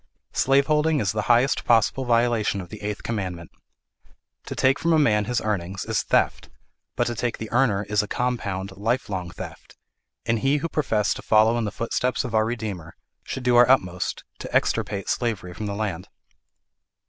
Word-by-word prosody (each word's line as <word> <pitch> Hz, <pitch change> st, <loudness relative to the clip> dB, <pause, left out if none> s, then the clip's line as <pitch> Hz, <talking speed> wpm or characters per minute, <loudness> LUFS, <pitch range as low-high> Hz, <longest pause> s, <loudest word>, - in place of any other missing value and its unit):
Slaveholding 150 Hz, +3 st, +3 dB
is 100 Hz, -6 st, +1 dB
the 105 Hz, 0 st, -1 dB
highest 120 Hz, +3 st, +3 dB
possible 120 Hz, +3 st, +2 dB
violation 115 Hz, -4 st, +2 dB
of 90 Hz, -2 st, -8 dB
the 105 Hz, -, -9 dB
eighth 105 Hz, 0 st, -4 dB
commandment. 90 Hz, -7 st, -4 dB, 1.0 s
To -, -, -5 dB
take 130 Hz, +1 st, +3 dB
from 170 Hz, 0 st, +2 dB
a -, -, +5 dB
man 105 Hz, -8 st, +3 dB
his 120 Hz, +1 st, 0 dB
earnings, 95 Hz, -3 st, -3 dB
is -, -, 0 dB
theft; -, -, 0 dB, 0.5 s
but -, -, +1 dB
to 120 Hz, -, -1 dB
take 120 Hz, 0 st, -2 dB
the 110 Hz, -, -7 dB
earner 115 Hz, -5 st, +2 dB
is 105 Hz, 0 st, +1 dB
a 105 Hz, -, -5 dB
compound, 100 Hz, -6 st, -2 dB
life 115 Hz, +6 st, -1 dB
long 90 Hz, -3 st, -3 dB
theft; -, -, -10 dB, 0.5 s
and 115 Hz, -1 st, 0 dB
we 135 Hz, +2 st, +3 dB
who 165 Hz, +3 st, -3 dB
profess 110 Hz, -10 st, +1 dB
to -, -, -8 dB
follow 110 Hz, +1 st, +4 dB
in 120 Hz, -2 st, 0 dB
the 105 Hz, -, -3 dB
footsteps 125 Hz, +2 st, -1 dB
of 125 Hz, -, -5 dB
our 110 Hz, 0 st, +3 dB
Redeemer, 105 Hz, -8 st, -5 dB, 0.3 s
should 130 Hz, -, -5 dB
do 125 Hz, 0 st, +3 dB
our 120 Hz, 0 st, +7 dB
utmost 90 Hz, -9 st, +1 dB, 0.2 s
to -, -, -7 dB
extirpate 100 Hz, -2 st, 0 dB
slavery 105 Hz, -7 st, -2 dB
from 105 Hz, +4 st, -5 dB
the 100 Hz, -, -3 dB
land. 100 Hz, -4 st, -3 dB
110 Hz, 185 wpm, -24 LUFS, 100-125 Hz, 1.0 s, our